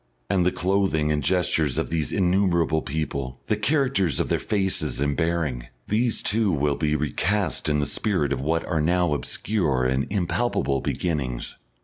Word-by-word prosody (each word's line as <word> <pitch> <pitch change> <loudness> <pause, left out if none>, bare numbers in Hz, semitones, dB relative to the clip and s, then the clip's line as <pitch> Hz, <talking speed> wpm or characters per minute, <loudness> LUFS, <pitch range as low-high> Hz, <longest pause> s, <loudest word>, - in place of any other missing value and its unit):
And 95 -3 +3
the - - +3
clothing 90 -5 +1
and 75 0 0
gestures 80 -3 +1
of - - -2
these 80 -3 -1
innumerable 90 -4 +2
people, 70 -3 -4
the 110 - +1
character 130 -2 +1
of 75 -6 -1
their - - +1
faces 95 -8 -1
and 70 0 0
bearing, 80 -8 -1 0.2
these 115 +3 +1
too 110 -1 +2
will 75 -2 +1
be 75 -1 0
recast 80 +3 0
in 75 - +2
the 75 - +1
spirit 75 - 0
of 65 - -3
what 80 +3 0
are 80 -3 0
now 85 0 +2
obscure 75 -4 0
and 65 +1 0
impalpable 95 - 0
beginnings. 70 -8 -2
80 Hz, 160 wpm, -24 LUFS, 75-95 Hz, 0.2 s, And